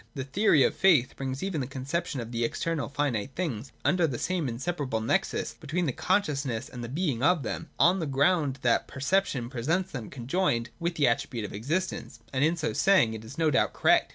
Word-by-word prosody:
The 135 - -3
theory 150 +1 +3
of - - +2
faith 155 -10 +4
brings 135 +2 -4
even 185 -7 -1
the 130 - -3
conception 140 +3 -3
of 115 +1 -8
external 140 +7 -1
finite 135 -4 -2
things 135 - -3
under 175 -2 +3
the 130 -5 -3
same 175 -3 -1
inseparable 135 -1 -2
nexus 110 - 0
between 175 +5 -2
the 140 - +1
consciousness 140 - 0
and 120 -1 -7
the 115 - -5
being 145 -4 -1
of 155 +1 +3
them, 165 - -4
on 180 +3 +5
the 160 - -2
ground 140 0 +2
^hz 120 -2 +4
t - - -21
perception 140 -3 0
presents 160 +10 -1
them 120 -7 -6
conjoined 125 -2 -1
with 170 0 -1
the 145 -4 +3
attribute 115 -1 -1
of - - -8
existence: 155 - -3
and 130 +1 +1
in 165 +3 +2
so 155 -1 -1
saying, 185 - +4
it 110 -1 -7
is 110 +4 -10
no 160 -2 +2
doubt 130 - +2
correct. - - +3
140 Hz, 205 wpm, -28 LUFS, 125-170 Hz, -, on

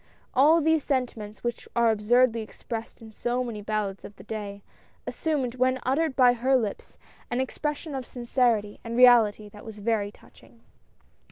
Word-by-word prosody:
All 310 +5 +5
these 320 -1 +2
sentiments, 235 -6 -3
which 240 -1 -4
are 235 -1 +4
absurdly 230 +2 +3
expressed 225 +1 -7
in 220 - -11
so 240 +3 -2
many 230 -4 -6
ballads 205 -2 -3
of 205 - -10
the - - -14
day, 205 -2 -6 0.4
assumed, 285 -7 -2
when 255 +1 +1
uttered 275 +2 0
by 250 -2 +6
her 255 +3 +1
lips, 220 -6 -3 0.3
an 240 - -1
expression 295 +3 -3
of 265 -2 -5
sincerity 235 -4 0
and 230 0 -4
reality 230 -4 +5
that 205 0 -14
was 220 -2 -9
very 205 -1 -1
touching. 230 +2 -21
235 Hz, 160 wpm, -26 LUFS, 215-255 Hz, 0.4 s, by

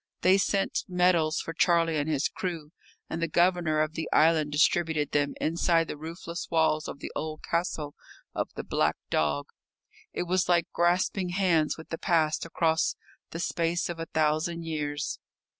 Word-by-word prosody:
They 185 +2 +5
sent 195 0 0
medals 180 -4 +2
for 165 - -6
Charlie 165 -1 +2
and 145 +1 -1
his 150 -1 +1
crew, 165 -5 -5 0.4
and 165 - -4
the 165 - +1
Governor 170 -2 +2
of 155 0 -1
the 160 -1 -4
island 155 -1 +4
distributed 155 0 +2
them 145 -1 0
inside 165 0 +2
the - - -5
roofless 170 +2 -7
walls 160 -1 +2
of - - -6
the - - -6
old 155 0 -4
castle 165 -4 -2 0.4
of - - -2
the - - -4
"Black - - +1 0.2
Dog." 75 -2 +1 0.7
It - - -2
was 180 +1 0
like 170 -2 +4
grasping 180 +2 +1
hands 175 -5 +1
with 160 - -11
the 165 - -4
past 160 -2 +1
across 160 -1 +1 0.3
the 165 - -6
space 170 0 -1
of 170 -1 -5
a 165 - -4
thousand 160 +2 0
years. 150 -2 -3
165 Hz, 165 wpm, -28 LUFS, 155-175 Hz, 0.7 s, They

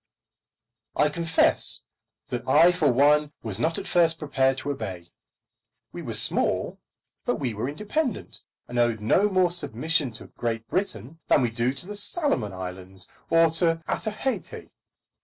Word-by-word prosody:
I 150 - +3
confess 165 +2 +1 0.4
that 125 +1 -4
I 160 +6 +6
for 155 -6 +2
one 145 +3 +3
was 110 -2 -3
not 160 +5 0
at - - -5
first 165 -2 +3
prepared 135 -3 +1
to 145 - -3
obey. 95 -10 -6 0.8
We - - -7
were - - -2
small, - - +1 0.4
but - - 0
we 125 -4 -3
were 110 +5 -3
independent, 215 - -3 0.3
and 120 0 -3
owed 120 -2 +2
no 185 - +3
more 185 -2 +3
of 175 - +1
submission 155 -2 0
to - - -9
Great 115 -2 -4
Britain 160 - -3
than 130 - +4
we 120 - 0
do 115 +2 +1
to 140 - -8
the 205 - -7
Salomon 205 - -1
Islands 95 0 -8 0.2
or 165 -1 +5
to 165 0 +1
Otaheite. 220 +4 -3
145 Hz, 155 wpm, -25 LUFS, 115-170 Hz, 0.8 s, I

